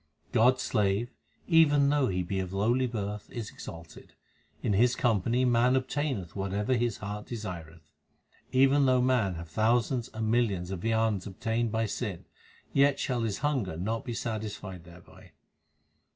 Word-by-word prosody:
God 125 +3 +5
s - - -5
slave, 105 +2 0 0.4
even 145 -5 +5
though 145 -2 +2
he 90 -1 -1
be 95 +2 -2
of 95 0 -4
lowly 120 +6 +2
birth, 105 -3 -5
is 115 -4 -6
exalted; 80 -1 -11 0.5
in 105 - +1
his 120 +5 +3
company 120 +2 +1
man 125 +1 +3
obtaineth 130 - -2
whatever 100 +4 -1
his 120 -2 0
heart 105 +1 -6
desireth. 85 -8 -7 0.7
Even 135 +1 +4
though 130 0 +4
man 120 -8 +2
have 85 0 -8
thousands 115 - +1
and 110 0 -2
millions 100 -7 +1
of 95 -3 -4
viands 110 -3 0
obtained 115 +4 -1
by 110 0 0
sin, 105 - -4 0.5
yet 140 0 +4
shall 125 -3 -1
his 110 -3 -1
hunger 120 - -1
not 110 +6 -2
be 120 -3 -5
satisfied 105 -6 -5
thereby. 85 0 -16
110 Hz, 150 wpm, -29 LUFS, 95-125 Hz, 0.7 s, God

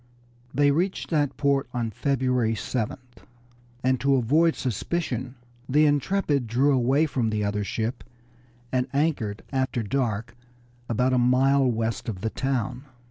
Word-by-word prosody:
They 145 0 +3
reached 180 +6 -1
that 145 -4 +1
port 140 -3 +1
on 115 -2 -1
February 125 -2 0
7th, 125 +2 -4 0.6
and 130 0 +2
to 140 0 +3
avoid 155 +7 +3
suspicion 130 - -3 0.3
the 150 +3 +4
Intrepid 145 -2 +1
drew 130 +6 +3
away 135 +4 +3
from 125 -7 -1
the 105 -1 -1
other 105 0 -1
ship 110 +5 -3 0.7
and 130 0 0
anchored 140 -9 0
after 130 -3 -1
dark 115 -1 -2 0.5
about 125 +3 +1
a 125 - +3
mile 130 +2 +4
west 115 -1 -2
of 95 -5 -5
the 110 - -2
town. 130 -1 -2
130 Hz, 135 wpm, -25 LUFS, 115-140 Hz, 0.7 s, the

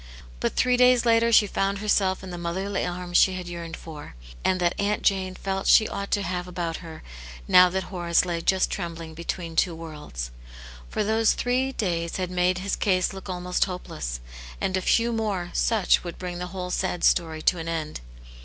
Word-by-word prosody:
But - - -1
.three 250 0 +3
days 250 -1 +5
later 230 0 +4
she 220 -2 +7
found 195 0 -1
herself 195 -2 +1
in 185 - -7
the 175 -1 -6
m - - -6
otherly 190 +3 -2
arms 175 0 -1
she 190 - +5
had 180 -1 -5
yearned 170 -1 -6
for, 150 - -10 0.3
and 185 - +2
that 175 -1 +2
Aunt 205 +1 0
^ - - +6
ane 185 -1 -5
felt 195 0 -3
she 220 - +6
ought 200 0 -5
to 205 - +1
have 180 -1 -3
about 170 -2 -3
her 160 -2 -10 0.4
now 180 0 +7
that 190 +1 -2
Horace 175 -2 +1
lay 170 -2 -2
just 190 +2 +2
trembling 165 -3 -5
between 170 0 -5
two 170 0 +2
worlds. 150 - -7 0.6
For - - -1
those 220 +1 +3
three 255 +2 0
days 170 -8 -2
had 185 -1 -2
made 180 0 +2
his 190 +2 -2
case 185 -3 +1
look 190 0 -9
almost 180 0 0
hopeless, 70 - -5 0.4
and 190 - -1
a 185 - 0
few 230 +4 +2
more 200 -6 -2
such 220 -5 +2
would 175 -2 -7
bring 180 -1 -5
the 180 - -4
whole 180 0 -5
sad 180 -2 -1
story 160 -2 +2
to 180 - +3
an 165 - -5
end. 160 -2 -3
180 Hz, 200 wpm, -25 LUFS, 170-195 Hz, 0.6 s, she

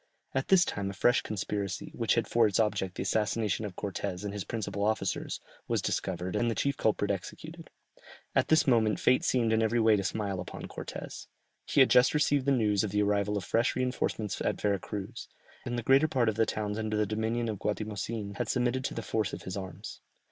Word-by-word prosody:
At 135 0 -1
this 190 -1 +6
time 100 -1 -3
a - - -5
fresh 120 +5 +3
conspiracy, 100 -1 -3
which 115 -2 +1
had 115 - +1
for 115 -2 +4
its 100 - 0
object 95 -4 0
the - - -3
assassination 105 +1 0
of 95 -3 -6
Cortès 100 -1 -4
and 100 - -3
his 105 -2 -4
principal 105 -3 -3
officers, 105 -3 -1 0.3
was - - +1
discovered, 90 0 -2
and 120 - +2
the 115 - -1
chief 140 0 0
culprit 105 -3 +1
executed. 95 -3 -7 0.6
At - - +2
this 160 - +4
moment 115 -5 +3
fate 130 - +3
seemed 115 -3 +2
in 110 - +3
every 110 +2 +2
way 110 -1 +5
to 100 - -1
smile 100 -1 -2
upon - - -7
Cortès; - - -7 0.4
he 140 - +4
had 130 - +5
just 125 +4 +5
received 145 -2 +2
the - - +5
news 105 -6 +2
of 105 - -1
the 105 +1 +1
arrival 105 0 +1
of 100 - -3
fresh 115 +2 +1
reinforcements 125 -5 -1
at - - -1
Vera 100 -2 +1
Cruz, 100 +1 -6 0.4
and 120 0 -2
the 120 - -3
greater 135 +5 +5
part 130 -7 +2
of 110 - -2
the 110 0 +2
towns 105 0 -2
under 110 -1 -1
the 105 - +2
dominion 110 +3 -1
of 105 -3 -3
Guatimozin 105 0 -3
had - - -2
submitted 125 +1 +1
to - - -3
the 115 - -4
force 110 -2 -1
of - - -6
his 95 - -5
arms. 95 -2 -7
110 Hz, 215 wpm, -30 LUFS, 100-120 Hz, 0.6 s, this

